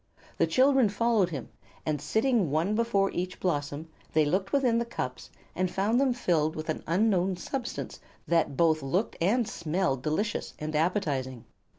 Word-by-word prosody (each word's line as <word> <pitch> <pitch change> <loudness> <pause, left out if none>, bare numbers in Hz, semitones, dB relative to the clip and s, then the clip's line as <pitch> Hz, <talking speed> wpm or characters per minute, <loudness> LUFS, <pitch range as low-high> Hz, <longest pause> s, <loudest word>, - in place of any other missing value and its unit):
The - - +4
children 265 -3 +4
followed 215 -2 +2
him, 140 -7 -6 0.4
and 150 -2 -1
sitting 220 - +1
one 160 +8 +1
before 215 -3 +1
each 180 +1 -4
blossom 145 -2 -2 0.3
they 155 -1 +4
looked 190 +6 0
within 250 -5 +3
the - - +1
cups 130 - -5 0.3
and 185 0 0
found 210 +7 +1
them 270 -2 +3
filled 170 -9 +1
with 155 +1 -6
an 155 - -2
unknown 185 0 +2
substance 245 +6 -5 0.3
that 165 -5 +1
both 160 -2 +3
looked 175 +11 -1
and 220 +6 +2
smelled 160 -5 -1
delicious 200 - -2
and 155 0 -4
appetizing. 145 - -1
180 Hz, 160 wpm, -28 LUFS, 155-220 Hz, 0.4 s, The